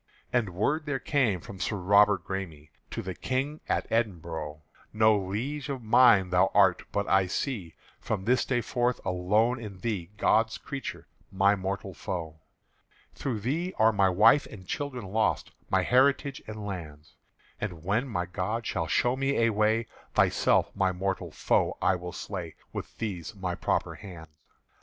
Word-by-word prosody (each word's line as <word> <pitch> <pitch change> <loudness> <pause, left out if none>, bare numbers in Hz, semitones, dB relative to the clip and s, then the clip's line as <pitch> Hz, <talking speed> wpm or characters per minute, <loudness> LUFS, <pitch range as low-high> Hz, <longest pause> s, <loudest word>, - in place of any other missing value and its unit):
And 110 -8 0
word 150 - 0
there 145 -2 0
came 125 - +1
from 95 +2 -10
Sir 105 - -1
Robert 100 0 +4
Græme 85 -6 -5 0.2
To - - -5
the 95 - -4
King 135 - -2
at - - 0
Edinbro': 80 -9 -2 0.3
"No 110 0 +4
Liege 115 +9 -3
of 135 -3 -4
mine 110 -5 +5
thou 90 0 +4
art; 95 -3 +5
but 100 0 -1
I 95 -1 +3
see 100 - -3 0.2
From 100 -3 -3
this 125 +2 +3
day 125 -2 0
forth 120 +1 0
alone 105 +7 +2
in 105 -4 -8
thee 100 -7 -2
God's 110 +2 +2
creature, 140 -1 -6 0.3
my 100 +1 +4
mortal 95 0 -4
foe. 80 -4 -5 0.7
"Through 120 -6 -3
thee 165 - -2
are 110 +1 +5
my 100 -2 +4
wife 110 +10 +5
and 95 -4 -11
children 135 -6 -4
lost, 110 +4 0 0.2
My 95 -1 +2
heritage 135 +4 +3
and 105 -1 -6
lands; 75 -6 -7 0.5
And 85 -6 -5
when 110 +9 0
my 90 -8 -2
God 95 +6 -3
shall 80 -4 -1
show 120 +8 +2
me 135 +1 0
a 115 - +4
way, 110 +2 +2 0.3
Thyself - - +3
my 95 -2 +2
mortal 95 +1 -2
foe - - +1
will 90 -2 +1
I 90 - -7
slay 90 -5 -6 0.2
With - - -7
these 105 -1 -4
my 95 -2 -3
proper - - -1
hands." 85 -6 -10
100 Hz, 160 wpm, -28 LUFS, 90-120 Hz, 0.7 s, mine